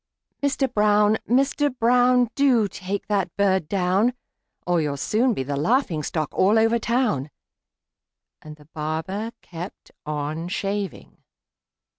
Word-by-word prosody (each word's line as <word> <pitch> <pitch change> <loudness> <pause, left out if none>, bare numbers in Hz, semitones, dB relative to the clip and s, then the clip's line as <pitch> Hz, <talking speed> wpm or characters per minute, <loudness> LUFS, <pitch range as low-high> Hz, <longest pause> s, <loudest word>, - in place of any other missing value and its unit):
Mister 280 -1 +1
Brown! 210 -2 +3
Mister 275 +4 +2
Brown! 245 0 +3
Do 255 -7 +3
take 195 +1 -5
that 200 -3 0
bird 190 -5 +2
down, 195 +6 +1 0.5
Or 175 -2 +2
you'll 145 -2 -2
soon 230 - +1
be 130 - -2
the 140 +2 -3
laughing 170 - +1
stock 155 -1 -2
all 200 +4 +3
over 225 +1 +3
town!" 225 - 0 1.1
And 155 0 -10
the 150 -1 -19
barber 160 +8 -3
kept 175 +3 -9
on 150 +2 -4
shaving. 200 +1 -4
200 Hz, 125 wpm, -23 LUFS, 160-235 Hz, 1.1 s, Brown